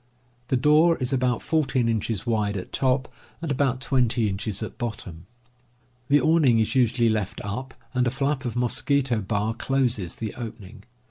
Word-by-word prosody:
The 130 Hz, -, +1 dB
door 155 Hz, +5 st, +4 dB
is 130 Hz, +1 st, -2 dB
about 125 Hz, -2 st, 0 dB
14 140 Hz, -6 st, +1 dB
inches 110 Hz, -2 st, -1 dB
wide 105 Hz, -4 st, 0 dB
at 90 Hz, -, -7 dB
top 130 Hz, 0 st, +1 dB, 0.3 s
and 160 Hz, -2 st, -3 dB
about 130 Hz, -2 st, 0 dB
20 125 Hz, -5 st, +2 dB
inches 100 Hz, +2 st, -3 dB
at 110 Hz, -, -8 dB
bottom. 100 Hz, -8 st, -6 dB, 0.8 s
The 145 Hz, +1 st, +5 dB
awning 155 Hz, -8 st, +4 dB
is 110 Hz, -1 st, +1 dB
usually 120 Hz, -2 st, +3 dB
left 110 Hz, -3 st, -1 dB
up, 130 Hz, +6 st, -5 dB, 0.2 s
and 125 Hz, -1 st, +1 dB
a -, -, +3 dB
flap 135 Hz, +1 st, -1 dB
of 120 Hz, -3 st, -4 dB
mosquito 125 Hz, 0 st, +1 dB
bar 105 Hz, +2 st, -1 dB
closes 120 Hz, -7 st, -1 dB
the 110 Hz, -2 st, -5 dB
opening. 110 Hz, -3 st, -9 dB
120 Hz, 160 wpm, -25 LUFS, 110-135 Hz, 0.8 s, The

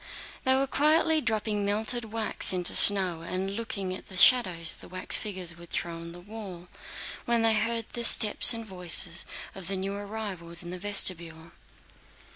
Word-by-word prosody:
They 260 Hz, 0 st, +3 dB
were 270 Hz, +1 st, +1 dB
quietly 310 Hz, +3 st, +2 dB
dropping 215 Hz, -3 st, -2 dB
melted 220 Hz, +4 st, -2 dB
wax 220 Hz, 0 st, -1 dB
into 180 Hz, -1 st, -1 dB
snow 185 Hz, -5 st, +4 dB
and 185 Hz, +3 st, -4 dB
looking 200 Hz, -5 st, -5 dB
at 185 Hz, -, -9 dB
the 190 Hz, -, -10 dB
shadows 180 Hz, -8 st, +4 dB
the -, -, -13 dB
wax 185 Hz, 0 st, 0 dB
figures 185 Hz, -5 st, -2 dB
would 170 Hz, 0 st, -13 dB
throw 170 Hz, -, -3 dB
on 165 Hz, 0 st, -9 dB
the 175 Hz, -, -11 dB
wall, 185 Hz, -3 st, -11 dB, 0.6 s
when 235 Hz, -1 st, 0 dB
they 225 Hz, -1 st, +3 dB
heard 230 Hz, +1 st, -1 dB
the 240 Hz, -, -3 dB
steps 220 Hz, -2 st, +6 dB
and 230 Hz, -1 st, -4 dB
voices 180 Hz, -2 st, +2 dB, 0.3 s
of 190 Hz, -2 st, -9 dB
new 195 Hz, 0 st, -3 dB
arrivals 200 Hz, -5 st, -7 dB
in 175 Hz, -, -9 dB
the 180 Hz, -, -7 dB
vestibule. 170 Hz, -5 st, -1 dB
195 Hz, 165 wpm, -27 LUFS, 175-225 Hz, 0.6 s, steps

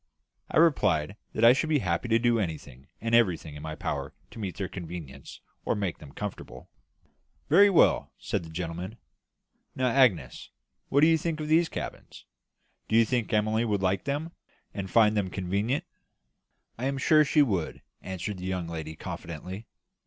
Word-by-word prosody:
I -, -, -1 dB
replied 105 Hz, -, +3 dB, 0.2 s
that 115 Hz, -, +2 dB
I 120 Hz, -, +9 dB
should 145 Hz, +4 st, -1 dB
be 155 Hz, -, +3 dB
happy 90 Hz, -5 st, -1 dB
to 115 Hz, -, +4 dB
do 120 Hz, 0 st, +2 dB
anything 70 Hz, -, -5 dB
and 115 Hz, +1 st, -3 dB
everything 90 Hz, -9 st, +2 dB
in 75 Hz, -, -9 dB
my 80 Hz, 0 st, -5 dB
power -, -, -4 dB, 0.2 s
to -, -, -10 dB
meet 95 Hz, -4 st, -5 dB
their 95 Hz, -2 st, -2 dB
convenience 85 Hz, -6 st, -9 dB, 0.2 s
or -, -, 0 dB
make 100 Hz, -5 st, -3 dB
them 70 Hz, -2 st, -12 dB
comfortable. 105 Hz, +5 st, -7 dB, 0.8 s
"Very 205 Hz, +1 st, +7 dB
well," 185 Hz, -, +3 dB
said -, -, -2 dB
the 80 Hz, -, -10 dB
gentleman. 90 Hz, +5 st, -5 dB, 0.8 s
"Now, 130 Hz, -1 st, +1 dB
Agnes, 125 Hz, -7 st, +2 dB, 0.4 s
what 140 Hz, -, +3 dB
do 155 Hz, -, +7 dB
you 165 Hz, -1 st, +4 dB
think 160 Hz, -1 st, -2 dB
of 155 Hz, 0 st, -4 dB
these 165 Hz, +1 st, +4 dB
cabins? -, -, -7 dB, 0.6 s
Do 110 Hz, -, 0 dB
you 115 Hz, 0 st, +6 dB
think 120 Hz, -1 st, -1 dB
Emily 110 Hz, +1 st, +2 dB
would 105 Hz, -4 st, -1 dB
like 95 Hz, 0 st, 0 dB
them, 145 Hz, +4 st, -2 dB, 0.4 s
and 95 Hz, -2 st, -5 dB
find 110 Hz, 0 st, +4 dB
them 100 Hz, -3 st, 0 dB
convenient?" 100 Hz, +8 st, -1 dB, 1.0 s
"I 125 Hz, -, -2 dB
am 140 Hz, 0 st, -1 dB
sure 155 Hz, +3 st, +5 dB
she 145 Hz, +1 st, +4 dB
would," 95 Hz, -, -2 dB, 0.2 s
answered 95 Hz, +2 st, -5 dB
the 90 Hz, -, -6 dB
young 90 Hz, -2 st, -2 dB
lady, 80 Hz, -1 st, -6 dB
confidently. 90 Hz, +8 st, -7 dB
105 Hz, 175 wpm, -28 LUFS, 90-125 Hz, 1.0 s, I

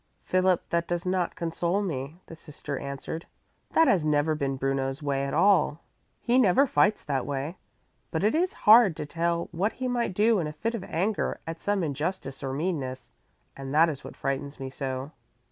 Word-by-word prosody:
"Philip, 185 Hz, -1 st, +2 dB
that 170 Hz, 0 st, 0 dB
does 175 Hz, 0 st, -2 dB
not 180 Hz, -1 st, 0 dB
console 170 Hz, +3 st, -1 dB
me," 145 Hz, -3 st, -4 dB
the 165 Hz, -, -10 dB
sister 150 Hz, -3 st, -7 dB
answered. 140 Hz, +4 st, -6 dB, 0.5 s
"That 325 Hz, -, +5 dB
has 180 Hz, -6 st, +3 dB
never 150 Hz, +1 st, +2 dB
been 140 Hz, -3 st, -1 dB
Bruno's 135 Hz, +1 st, -2 dB
way 140 Hz, -1 st, 0 dB
at 140 Hz, -, -4 dB
all. 185 Hz, -6 st, +3 dB, 0.4 s
He 245 Hz, +2 st, +3 dB
never 250 Hz, +4 st, +5 dB
fights 210 Hz, -5 st, +2 dB
that 135 Hz, -3 st, -1 dB
way. 145 Hz, +5 st, -4 dB, 0.5 s
But 160 Hz, +1 st, -2 dB
it 215 Hz, -, +3 dB
is 360 Hz, +4 st, +2 dB
hard 215 Hz, -5 st, +8 dB
to -, -, -5 dB
tell 170 Hz, +2 st, -1 dB
what 190 Hz, +6 st, 0 dB
he 255 Hz, +1 st, -3 dB
might 240 Hz, -6 st, -1 dB
do 215 Hz, +1 st, +4 dB
in 160 Hz, -, -1 dB
a 150 Hz, -, -6 dB
fit 225 Hz, +9 st, -2 dB
of 225 Hz, -5 st, -4 dB
anger 195 Hz, +6 st, -1 dB
at 165 Hz, 0 st, -6 dB
some 205 Hz, -2 st, 0 dB
injustice 150 Hz, -1 st, -3 dB
or 135 Hz, -, -3 dB
meanness, 140 Hz, -4 st, -3 dB, 0.4 s
and 135 Hz, +1 st, -6 dB
that 165 Hz, +2 st, +6 dB
is 140 Hz, -4 st, -6 dB
what -, -, -10 dB
frightens 140 Hz, +1 st, -3 dB
me 135 Hz, -1 st, -5 dB
so." 135 Hz, +1 st, -4 dB
165 Hz, 190 wpm, -27 LUFS, 140-190 Hz, 0.5 s, hard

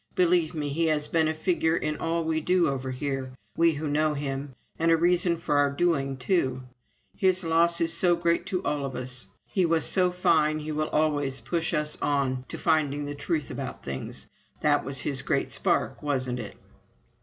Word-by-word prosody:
Believe 175 Hz, -2 st, +3 dB
me, 150 Hz, -2 st, -2 dB
he 165 Hz, +4 st, +1 dB
has 150 Hz, -2 st, +1 dB
been 160 Hz, -2 st, +2 dB
a 155 Hz, -, 0 dB
figure 165 Hz, 0 st, +1 dB
in 150 Hz, 0 st, -2 dB
all 165 Hz, 0 st, -1 dB
we 160 Hz, 0 st, 0 dB
do 180 Hz, +1 st, +3 dB
over 135 Hz, -2 st, -2 dB
here, 130 Hz, 0 st, -3 dB, 0.2 s
we 165 Hz, 0 st, +4 dB
who 150 Hz, +1 st, -4 dB
knew 150 Hz, +1 st, +1 dB
him, 140 Hz, -1 st, -4 dB, 0.2 s
and 165 Hz, +1 st, +2 dB
a 165 Hz, -, +5 dB
reason 175 Hz, 0 st, +2 dB
for 150 Hz, -3 st, 0 dB
our 145 Hz, 0 st, +4 dB
doing, 140 Hz, -3 st, 0 dB
too. 130 Hz, -3 st, 0 dB, 0.5 s
His 185 Hz, -2 st, +2 dB
loss 170 Hz, +1 st, +3 dB
is 165 Hz, -1 st, +2 dB
so 175 Hz, +1 st, +4 dB
great 170 Hz, 0 st, 0 dB
to 185 Hz, -, -2 dB
all 145 Hz, -1 st, -1 dB
of 135 Hz, -2 st, -4 dB
us!... 125 Hz, 0 st, -5 dB, 0.2 s
He 190 Hz, -, 0 dB
was 165 Hz, -2 st, +2 dB
so 185 Hz, -2 st, +2 dB
fine 155 Hz, -4 st, +2 dB
he 155 Hz, 0 st, -5 dB
will 155 Hz, 0 st, -1 dB
always 145 Hz, -3 st, 0 dB
push 165 Hz, -2 st, -2 dB
us 150 Hz, -2 st, -1 dB
on 130 Hz, -3 st, 0 dB
to -, -, -6 dB
finding 145 Hz, -3 st, +1 dB
the 145 Hz, -, -4 dB
truth 145 Hz, -1 st, -2 dB
about -, -, -6 dB
things. 70 Hz, -1 st, -6 dB, 0.4 s
That -, -, +3 dB
was 135 Hz, 0 st, -1 dB
his 135 Hz, -3 st, 0 dB
great 140 Hz, -, -1 dB
spark, -, -, 0 dB
wasn't 130 Hz, -4 st, -1 dB
it?" 105 Hz, -, -7 dB
155 Hz, 195 wpm, -27 LUFS, 140-170 Hz, 0.5 s, a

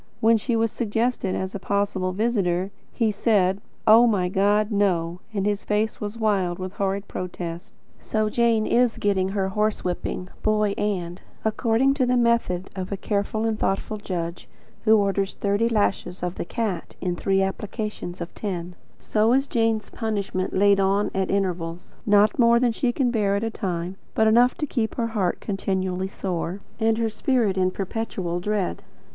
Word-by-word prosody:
When 225 Hz, +1 st, +5 dB
she 230 Hz, +2 st, 0 dB
was 225 Hz, -1 st, +1 dB
suggested 225 Hz, -3 st, -1 dB
as 190 Hz, 0 st, -3 dB
a 200 Hz, -, -4 dB
possible 200 Hz, -2 st, 0 dB
visitor, 195 Hz, -3 st, 0 dB, 0.2 s
he 225 Hz, -3 st, +1 dB
said: 200 Hz, -2 st, +2 dB, 0.2 s
"Oh, 230 Hz, +3 st, +7 dB
my 190 Hz, -5 st, +1 dB
God, 205 Hz, +3 st, +2 dB
NO!" 180 Hz, -4 st, +1 dB
and 200 Hz, -3 st, -1 dB
his 205 Hz, -1 st, 0 dB
face 210 Hz, +1 st, -1 dB
was 210 Hz, +2 st, -4 dB
one 220 Hz, -2 st, +2 dB
wild, 180 Hz, -3 st, 0 dB
horrified 195 Hz, +1 st, -3 dB
protest. 175 Hz, -2 st, -6 dB, 0.2 s
So 215 Hz, -1 st, -1 dB
Jane 230 Hz, 0 st, +2 dB
is 245 Hz, -1 st, +2 dB
getting 190 Hz, -2 st, +1 dB
her 195 Hz, -1 st, -1 dB
horsewhipping, 190 Hz, -3 st, -2 dB
Boy, 215 Hz, -1 st, +2 dB
and 185 Hz, -4 st, -2 dB, 0.2 s
according 230 Hz, +4 st, +2 dB
to 265 Hz, -3 st, +1 dB
the 250 Hz, 0 st, +3 dB
method 235 Hz, -7 st, +1 dB
of 185 Hz, 0 st, -5 dB
a 200 Hz, -, -2 dB
careful 210 Hz, +2 st, -1 dB
and 220 Hz, -1 st, -1 dB
thoughtful 195 Hz, +2 st, -1 dB
judge, 175 Hz, -4 st, -5 dB, 0.4 s
who 220 Hz, 0 st, +6 dB
orders 200 Hz, -1 st, 0 dB
thirty 205 Hz, +3 st, +1 dB
lashes 205 Hz, -4 st, 0 dB
of 180 Hz, -1 st, -1 dB
the -, -, -5 dB
"cat," 200 Hz, -4 st, -3 dB
in 180 Hz, -2 st, -1 dB
three 195 Hz, +2 st, +1 dB
applications 195 Hz, -2 st, -4 dB
of 170 Hz, -, -6 dB
ten 180 Hz, -4 st, -4 dB, 0.3 s
so 220 Hz, +2 st, +2 dB
is 270 Hz, +2 st, +2 dB
Jane's 225 Hz, -3 st, 0 dB
punishment 200 Hz, -4 st, -2 dB
laid 200 Hz, +1 st, +4 dB
on 195 Hz, +1 st, +2 dB
at 190 Hz, -1 st, -1 dB
intervals; 180 Hz, -3 st, -2 dB
not 205 Hz, +2 st, +4 dB
more 235 Hz, 0 st, +6 dB
than 245 Hz, -1 st, +3 dB
she 240 Hz, +2 st, 0 dB
can 245 Hz, -1 st, +1 dB
bear 205 Hz, -4 st, +1 dB
at 200 Hz, -, -1 dB
a 225 Hz, -, -1 dB
time; 180 Hz, -2 st, -3 dB, 0.2 s
but 220 Hz, -, +4 dB
enough 240 Hz, +3 st, +5 dB
to 300 Hz, -, -2 dB
keep 230 Hz, -6 st, -2 dB
her 235 Hz, -2 st, 0 dB
heart 190 Hz, -5 st, 0 dB
continually 190 Hz, -2 st, -2 dB
sore, 185 Hz, -1 st, -3 dB, 0.2 s
and 225 Hz, 0 st, +2 dB
her 230 Hz, 0 st, +1 dB
spirit 220 Hz, -2 st, +1 dB
in 185 Hz, -1 st, +2 dB
perpetual 185 Hz, -3 st, -3 dB
dread. 205 Hz, 0 st, -1 dB
205 Hz, 170 wpm, -24 LUFS, 185-225 Hz, 0.4 s, Oh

